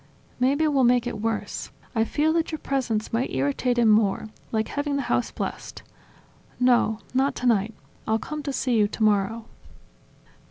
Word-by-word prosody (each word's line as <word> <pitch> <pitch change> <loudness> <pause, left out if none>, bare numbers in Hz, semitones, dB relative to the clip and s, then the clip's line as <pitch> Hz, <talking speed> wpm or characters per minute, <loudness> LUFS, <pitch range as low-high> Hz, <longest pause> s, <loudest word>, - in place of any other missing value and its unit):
"Maybe 280 +5 +2
we'll 280 -3 +2
make 245 0 +4
it 220 -4 -4
worse: 225 0 -3 0.2
I 225 -2 +2
fear 310 +6 +1
that 330 0 0
your 315 - -3
presence 245 -8 -2
might 235 +3 0
irritate 145 - 0
him 235 -2 +4
more, 215 0 +2 0.2
like 220 -1 -1
having 285 0 -2
the 280 - -1
house - - 0
blessed. - - -6 0.8
No, 245 -3 +3 0.2
not 270 +2 +1
tonight. 225 -3 +1 0.3
I'll 220 0 +2
come 305 +6 -5
to 280 -1 -3
see 260 -2 0
you 210 -2 +4
tomorrow 215 +1 +1
240 Hz, 160 wpm, -25 LUFS, 220-275 Hz, 0.8 s, make